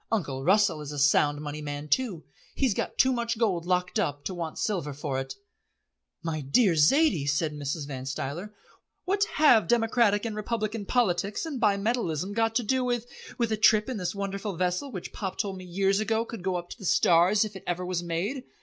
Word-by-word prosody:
Uncle 145 Hz, -12 st, -1 dB
Russell 190 Hz, -3 st, +3 dB
is 150 Hz, -1 st, -6 dB
a 145 Hz, -, -6 dB
Sound 145 Hz, +1 st, +3 dB
Money 150 Hz, 0 st, -5 dB
man 145 Hz, 0 st, -5 dB
too. 200 Hz, -, 0 dB, 0.3 s
He's 260 Hz, -6 st, +2 dB
got -, -, -3 dB
too 260 Hz, -1 st, +4 dB
much 235 Hz, -1 st, -2 dB
gold 185 Hz, -7 st, 0 dB
locked 180 Hz, 0 st, 0 dB
up 145 Hz, 0 st, -1 dB
to 190 Hz, -, -3 dB
want 170 Hz, -3 st, -5 dB
silver 175 Hz, -9 st, -2 dB
for 140 Hz, -1 st, -3 dB
it." 135 Hz, -, -5 dB, 0.9 s
"My 160 Hz, -2 st, -2 dB
dear 175 Hz, -, +3 dB
Zaidie," 165 Hz, -, +3 dB
said 150 Hz, +2 st, 0 dB
Mrs. 145 Hz, +1 st, -4 dB
Van 130 Hz, -2 st, -6 dB
Stuyler, 145 Hz, +9 st, -4 dB, 0.5 s
"what 395 Hz, +2 st, +2 dB
have 285 Hz, -8 st, +5 dB
democratic 225 Hz, -2 st, +2 dB
and 220 Hz, -2 st, -3 dB
republican 215 Hz, -1 st, -3 dB
politics 200 Hz, -, 0 dB
and 285 Hz, -7 st, -5 dB
bimetalism 200 Hz, -, 0 dB
got 225 Hz, +1 st, +1 dB
to 245 Hz, -, +2 dB
do 260 Hz, +4 st, +1 dB
with 240 Hz, -2 st, -1 dB, 0.2 s
" -, -, -14 dB
"With 235 Hz, -2 st, 0 dB
a 220 Hz, -, +1 dB
trip 215 Hz, 0 st, +4 dB
in 255 Hz, -, -3 dB
this 180 Hz, 0 st, -3 dB
wonderful 200 Hz, 0 st, -4 dB
vessel 180 Hz, -, -1 dB
which 185 Hz, -6 st, -7 dB
Pop 190 Hz, -3 st, -4 dB
told 195 Hz, -3 st, -2 dB
me 185 Hz, -, -9 dB
years 195 Hz, +2 st, +1 dB
ago 225 Hz, +1 st, 0 dB
could 230 Hz, -4 st, -8 dB
go 185 Hz, 0 st, -1 dB
up 175 Hz, 0 st, -5 dB
to -, -, -9 dB
the 195 Hz, -, -8 dB
stars 180 Hz, +5 st, +4 dB
if 210 Hz, -2 st, -8 dB
it 190 Hz, -, -9 dB
ever 180 Hz, +1 st, -2 dB
was 180 Hz, -1 st, -2 dB
made? 185 Hz, +11 st, -3 dB
195 Hz, 205 wpm, -27 LUFS, 165-225 Hz, 0.9 s, have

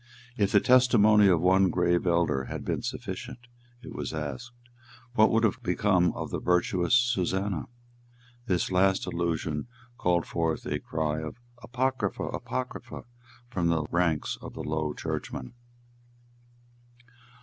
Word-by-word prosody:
"If 100 Hz, -4 st, +1 dB
the 100 Hz, -, +6 dB
testimony 110 Hz, -4 st, +5 dB
of 90 Hz, -4 st, +4 dB
one 95 Hz, +1 st, +4 dB
grave 90 Hz, 0 st, +1 dB
elder 85 Hz, -6 st, +1 dB
had -, -, -6 dB
been -, -, -1 dB
sufficient," 120 Hz, +6 st, -6 dB, 0.4 s
it 125 Hz, -2 st, -9 dB
was 80 Hz, -, -4 dB
asked, 75 Hz, -, -5 dB, 0.6 s
"what 110 Hz, -2 st, +5 dB
would 115 Hz, +1 st, +2 dB
have 110 Hz, -, +1 dB
become 90 Hz, -1 st, +2 dB
of -, -, -6 dB
the -, -, -2 dB
virtuous 90 Hz, +1 st, +2 dB
Susannah?" 100 Hz, -6 st, 0 dB, 0.8 s
This 90 Hz, -1 st, 0 dB
last 95 Hz, +1 st, +3 dB
allusion 80 Hz, -1 st, -2 dB, 0.3 s
called 85 Hz, -1 st, +1 dB
forth 80 Hz, -2 st, -2 dB
a -, -, -2 dB
cry 80 Hz, -1 st, -2 dB
of 80 Hz, +8 st, -7 dB, 0.2 s
"Apocrypha, 130 Hz, +2 st, -1 dB
Apocrypha," 125 Hz, -1 st, -5 dB, 0.5 s
from 90 Hz, -5 st, 0 dB
the 80 Hz, -2 st, +1 dB
ranks 85 Hz, -3 st, 0 dB
of -, -, -9 dB
the -, -, -5 dB
Low 75 Hz, -1 st, -2 dB
Churchmen. 65 Hz, -, -5 dB
90 Hz, 130 wpm, -28 LUFS, 85-110 Hz, 0.8 s, the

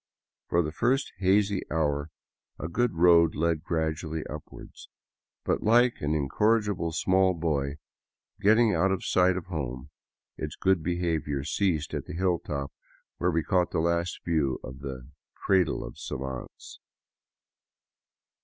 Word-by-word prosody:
For 85 Hz, 0 st, +2 dB
the 75 Hz, -, -3 dB
first 130 Hz, -, 0 dB
lazy 100 Hz, +1 st, +3 dB
hour 75 Hz, -1 st, 0 dB, 0.5 s
a -, -, -4 dB
good 120 Hz, +4 st, 0 dB
road 85 Hz, -1 st, +5 dB
led 80 Hz, -1 st, 0 dB
gradually 80 Hz, -1 st, -2 dB
upward. 75 Hz, -1 st, -9 dB, 0.7 s
But -, -, 0 dB
like 120 Hz, +2 st, +3 dB
an 75 Hz, +1 st, 0 dB
incorrigible 105 Hz, +4 st, +1 dB
small 95 Hz, +2 st, +2 dB
boy 75 Hz, -4 st, -1 dB, 0.6 s
getting 110 Hz, +2 st, +4 dB
out 95 Hz, +1 st, +2 dB
of 95 Hz, -, -2 dB
sight 90 Hz, 0 st, +3 dB
of 90 Hz, -, -5 dB
home, 70 Hz, -5 st, -5 dB, 0.5 s
its 75 Hz, -1 st, -5 dB
good 95 Hz, -3 st, +2 dB
behavior 80 Hz, -4 st, -1 dB
ceased 80 Hz, 0 st, -1 dB
at -, -, -3 dB
the -, -, -6 dB
hilltop 85 Hz, -6 st, -2 dB, 0.5 s
where 90 Hz, -, +2 dB
we 80 Hz, -2 st, +1 dB
caught 90 Hz, -3 st, +1 dB
the -, -, -1 dB
last 85 Hz, +1 st, 0 dB
view 75 Hz, -6 st, 0 dB
of 65 Hz, +1 st, -8 dB
the 65 Hz, -3 st, -7 dB
" -, -, -65 dB
cradle 95 Hz, -5 st, +2 dB
of -, -, -10 dB
savants." 65 Hz, -1 st, -7 dB
85 Hz, 135 wpm, -28 LUFS, 75-95 Hz, 0.7 s, road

